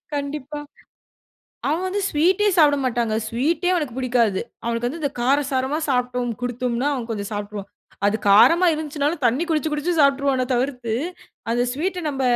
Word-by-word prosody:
கண்டிப்பா. 290 Hz, 0 st, -4 dB, 1.1 s
அவன் 330 Hz, +5 st, 0 dB
வந்து 400 Hz, +2 st, -1 dB
ஸ்வீட்டே 365 Hz, +7 st, +2 dB
சாப்ட 295 Hz, -3 st, +6 dB
மாட்டாங்கங்க. 235 Hz, -3 st, 0 dB
ஸ்வீட்டே 305 Hz, +10 st, 0 dB
அவனுக்கு 295 Hz, -8 st, -2 dB
பிடிக்காது. 240 Hz, -6 st, +1 dB, 0.2 s
அவனுக்கு 235 Hz, +1 st, -1 dB
வந்து 320 Hz, +6 st, -7 dB
இந்த 285 Hz, -, 0 dB
கார 265 Hz, +4 st, +3 dB
சாரமா 265 Hz, +3 st, 0 dB
சாப்ட்டோம் 250 Hz, -2 st, 0 dB
குடுத்தோம்னா 245 Hz, +2 st, -1 dB
அவன் 245 Hz, -3 st, -5 dB
கொஞ்சம் 205 Hz, -3 st, -3 dB
சாப்ட்ருவான். 205 Hz, -1 st, -5 dB, 0.4 s
அது 205 Hz, -, +2 dB
காரமா 335 Hz, -, +6 dB
இருந்துச்சுனாலும் 300 Hz, 0 st, -2 dB
தண்ணி 245 Hz, +7 st, +1 dB
குடிச்சு, 315 Hz, -1 st, 0 dB
குடிச்சு 300 Hz, +4 st, -1 dB
சாப்ட்ருவானே 275 Hz, -2 st, +3 dB
தவிர்த்து 245 Hz, -2 st, -2 dB, 0.6 s
அந்த 240 Hz, +1 st, +2 dB
ஸ்வீட்ட 360 Hz, +7 st, -2 dB
நம்ம 270 Hz, -2 st, -3 dB
265 Hz, 145 wpm, -22 LUFS, 240-300 Hz, 1.1 s, சாப்ட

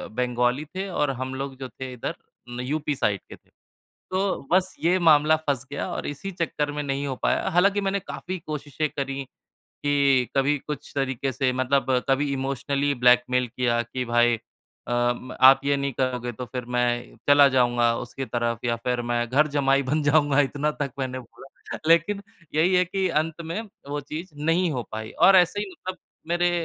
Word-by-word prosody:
बंगाली 125 Hz, +3 st, 0 dB
थे 190 Hz, +1 st, -3 dB
और 150 Hz, -5 st, 0 dB
हम 130 Hz, 0 st, -4 dB
लोग 135 Hz, 0 st, -5 dB
जो 130 Hz, -1 st, -6 dB
थे 130 Hz, 0 st, -7 dB
इधर 125 Hz, -, -4 dB, 0.3 s
न 120 Hz, 0 st, -6 dB
यूपी 145 Hz, +3 st, -2 dB
साइड 100 Hz, -6 st, 0 dB
के -, -, -9 dB
थे। -, -, -30 dB, 0.6 s
तो 185 Hz, -6 st, -1 dB
बस 185 Hz, +1 st, +2 dB
ये 175 Hz, +3 st, +3 dB
मामला 155 Hz, -2 st, +5 dB
फँस 140 Hz, -4 st, -2 dB
गया 140 Hz, -, -3 dB
और -, -, -4 dB
इसी 145 Hz, +7 st, -5 dB
चक्कर 160 Hz, -4 st, -2 dB
में 150 Hz, 0 st, -3 dB
नहीं 140 Hz, 0 st, -2 dB
हो 135 Hz, -, -2 dB
पाया -, -, +1 dB
हालाँकि 195 Hz, +4 st, +3 dB
मैंने 195 Hz, 0 st, -1 dB
काफ़ी 185 Hz, 0 st, -6 dB
कोशिशें 150 Hz, -1 st, -3 dB
करी, 135 Hz, -1 st, -4 dB, 0.4 s
कि 140 Hz, -3 st, +1 dB
कभी 140 Hz, +2 st, +3 dB
कुछ 150 Hz, 0 st, -7 dB
तरीके 135 Hz, -1 st, -1 dB
से 130 Hz, +1 st, 0 dB
मतलब 130 Hz, +2 st, +1 dB, 0.2 s
कभी 140 Hz, +1 st, +2 dB
इमोशनली 140 Hz, +1 st, -1 dB
ब्लैकमेल 125 Hz, +1 st, +4 dB
किया 120 Hz, 0 st, 0 dB
कि 125 Hz, +2 st, -4 dB
भाई 120 Hz, 0 st, +3 dB, 0.5 s
अ, 120 Hz, 0 st, +2 dB
म 130 Hz, +1 st, -9 dB
आप 135 Hz, +1 st, +8 dB
ये 140 Hz, 0 st, +2 dB
नहीं 140 Hz, -1 st, -2 dB
करोगे 125 Hz, -1 st, -1 dB
तो 125 Hz, +3 st, -6 dB
फिर 125 Hz, 0 st, -5 dB
मैं 120 Hz, 0 st, -1 dB
चला 145 Hz, 0 st, +8 dB
जाऊँगा 120 Hz, -2 st, +3 dB
उसकी 130 Hz, +2 st, -5 dB
तरफ 120 Hz, -2 st, -1 dB
या 120 Hz, -1 st, +1 dB
फिर 125 Hz, +1 st, -2 dB
मैं 120 Hz, 0 st, 0 dB
घर 145 Hz, +5 st, +3 dB
जमाई 135 Hz, 0 st, +3 dB
बन 145 Hz, +4 st, 0 dB
जाऊँगा 145 Hz, -1 st, +4 dB
इतना 145 Hz, +2 st, 0 dB
तक 140 Hz, -3 st, -2 dB
मैंने 130 Hz, -1 st, -3 dB
बोला। 130 Hz, +2 st, -11 dB
लेकिन 170 Hz, +5 st, +3 dB, 0.3 s
यही 170 Hz, +5 st, +3 dB
है 180 Hz, 0 st, +4 dB
कि 190 Hz, +1 st, -1 dB
अंत 160 Hz, 0 st, -1 dB
में 165 Hz, +6 st, -3 dB, 0.3 s
वो 145 Hz, +1 st, -2 dB
चीज़ 155 Hz, +5 st, -7 dB
नहीं 165 Hz, +4 st, +1 dB
हो 125 Hz, -3 st, -2 dB
पाई 110 Hz, 0 st, -5 dB
और 195 Hz, -, +6 dB
ऐसे 180 Hz, +3 st, +4 dB
ही 205 Hz, -, -2 dB
मतलब 185 Hz, 0 st, -7 dB, 0.3 s
मेरे 175 Hz, +1 st, +2 dB
140 Hz, 185 wpm, -25 LUFS, 125-155 Hz, 0.6 s, आप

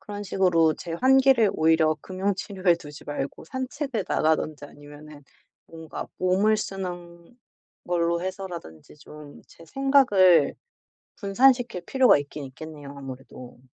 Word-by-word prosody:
그런 205 Hz, 0 st, -7 dB
식으로 170 Hz, -4 st, +2 dB
제 170 Hz, -, -8 dB
환기를 260 Hz, 0 st, +4 dB
오히려 160 Hz, 0 st, +3 dB
금융 190 Hz, +4 st, -2 dB
치료에 185 Hz, -2 st, 0 dB
두지 150 Hz, -3 st, -12 dB
말고 140 Hz, -2 st, -5 dB
산책을 260 Hz, -, -4 dB
나가든지 155 Hz, -1 st, 0 dB
아니면은 145 Hz, +1 st, -14 dB, 0.4 s
뭔가 160 Hz, -1 st, -8 dB
몸을 195 Hz, +4 st, +2 dB
쓰는 175 Hz, 0 st, -7 dB, 0.5 s
걸로 170 Hz, -1 st, 0 dB
해서라든지 175 Hz, -, -8 dB
좀 150 Hz, 0 st, -13 dB
제 165 Hz, -, -17 dB
생각을 200 Hz, -, +4 dB, 0.6 s
분산시킬 240 Hz, 0 st, +2 dB
필요가 265 Hz, -, +4 dB
있긴 145 Hz, 0 st, -7 dB
있겠네요, 145 Hz, +1 st, -10 dB
아무래도. 130 Hz, -2 st, -10 dB
175 Hz, 295 characters per minute, -25 LUFS, 150-205 Hz, 0.6 s, 환기를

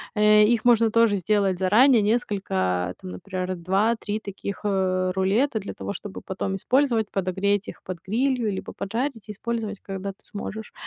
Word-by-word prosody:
Э, 210 Hz, 0 st, +6 dB
их 225 Hz, +1 st, +2 dB
можно 230 Hz, -2 st, +5 dB
тоже 230 Hz, -2 st, +4 dB
сделать 195 Hz, 0 st, +1 dB
заранее, 220 Hz, +7 st, +5 dB
несколько 95 Hz, -, 0 dB
там, 90 Hz, -, -7 dB
например, 185 Hz, -, -4 dB
2-3 205 Hz, +4 st, 0 dB
таких, 200 Hz, -1 st, -6 dB
э, 185 Hz, -2 st, +1 dB
рулета 215 Hz, +6 st, +2 dB
для 195 Hz, -, -6 dB
того, -, -, -5 dB
чтобы 205 Hz, -1 st, -8 dB
потом 190 Hz, 0 st, -3 dB
использовать, 240 Hz, -1 st, +1 dB
подогреть 195 Hz, +2 st, 0 dB
их -, -, -10 dB
под 185 Hz, -2 st, -6 dB
грилью 240 Hz, +2 st, +1 dB
либо 190 Hz, -, -6 dB
поджарить 225 Hz, +1 st, -3 dB
и -, -, -2 dB
использовать, 215 Hz, -1 st, -4 dB
когда 195 Hz, 0 st, -5 dB
ты 195 Hz, -, -21 dB
сможешь. 215 Hz, +1 st, -7 dB
205 Hz, 160 wpm, -24 LUFS, 190-225 Hz, -, Э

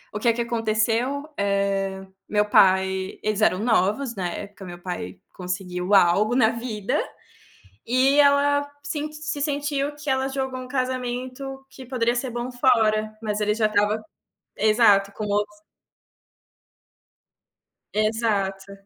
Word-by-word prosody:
O -, -, -1 dB
que 235 Hz, +2 st, +3 dB
que 235 Hz, -, -2 dB
aconteceu, 235 Hz, +5 st, 0 dB
eh, 195 Hz, -1 st, 0 dB, 0.2 s
meu 210 Hz, 0 st, +2 dB
pai, 190 Hz, -1 st, +3 dB
eles 215 Hz, 0 st, -1 dB
eram 185 Hz, -4 st, +4 dB
novos 225 Hz, +3 st, +1 dB
na 185 Hz, -3 st, -2 dB
época, 200 Hz, +2 st, -8 dB
meu 175 Hz, -1 st, -8 dB
pai 135 Hz, -, -6 dB
conseguiu 180 Hz, +1 st, -2 dB
algo 200 Hz, +6 st, +4 dB
na 225 Hz, -4 st, +5 dB
vida, 230 Hz, -4 st, -2 dB, 0.9 s
e 260 Hz, +4 st, +3 dB
ela 285 Hz, 0 st, +3 dB
sen 300 Hz, 0 st, -4 dB
se 300 Hz, -1 st, -5 dB
sentiu 290 Hz, -1 st, -1 dB
que 295 Hz, 0 st, -9 dB
ela 265 Hz, 0 st, +1 dB
jogou 265 Hz, -1 st, -3 dB
um 255 Hz, -, -9 dB
casamento 255 Hz, +1 st, -4 dB
que 265 Hz, -1 st, -12 dB
poderia 240 Hz, -2 st, 0 dB
ser 245 Hz, +1 st, -2 dB
bom 240 Hz, +1 st, -4 dB
fora, 220 Hz, -4 st, +2 dB
mas 210 Hz, -1 st, -2 dB
ele 210 Hz, 0 st, +2 dB
já 220 Hz, 0 st, +2 dB
estava 210 Hz, 0 st, +1 dB, 0.6 s
exato, 210 Hz, -2 st, +4 dB
com 215 Hz, -, -5 dB
o 205 Hz, 0 st, +1 dB, 2.5 s
Exato. 210 Hz, -3 st, 0 dB
220 Hz, 130 wpm, -24 LUFS, 200-260 Hz, 2.5 s, na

